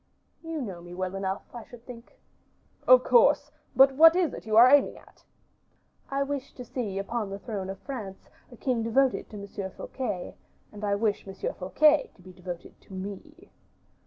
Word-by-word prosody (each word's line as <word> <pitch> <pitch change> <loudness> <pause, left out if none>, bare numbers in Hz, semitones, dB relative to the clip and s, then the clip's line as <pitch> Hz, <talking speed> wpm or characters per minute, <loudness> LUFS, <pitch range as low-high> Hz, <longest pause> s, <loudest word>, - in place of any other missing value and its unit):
"You 325 -1 -5
know 185 -6 -7
me 175 0 -10
well 185 0 -3
enough, 195 0 -3
I 240 -2 -8
should 240 -1 -15
think." 235 -1 -12 0.7
"Of - - +8
course; 480 - +4 0.2
but 270 +1 +7
what 325 +4 +7
is 355 -6 +1
it - - -9
you 215 0 +2
are 240 +2 +9
aiming 280 +2 +4
at?" - - -20 0.9
"I 275 0 0
wish 275 -1 -5
to 250 - -9
see 220 -6 -4
upon 210 +1 -3
the 195 - -5
throne 200 -3 -5
of 195 - -5
France 215 -9 -8 0.2
a 245 - -13
king 245 0 -1
devoted 255 +3 +1
to 210 - -9
Monsieur 200 -1 -6
Fouquet, 195 -3 -5 0.4
and 210 0 -11
I 200 -1 +1
wish 205 -1 -1
Monsieur 195 0 -4
Fouquet 295 +11 +3
to - - -20
be 185 0 -13
devoted 180 -1 -9
to - - -16
me." 205 - -9
225 Hz, 185 wpm, -27 LUFS, 195-270 Hz, 0.9 s, are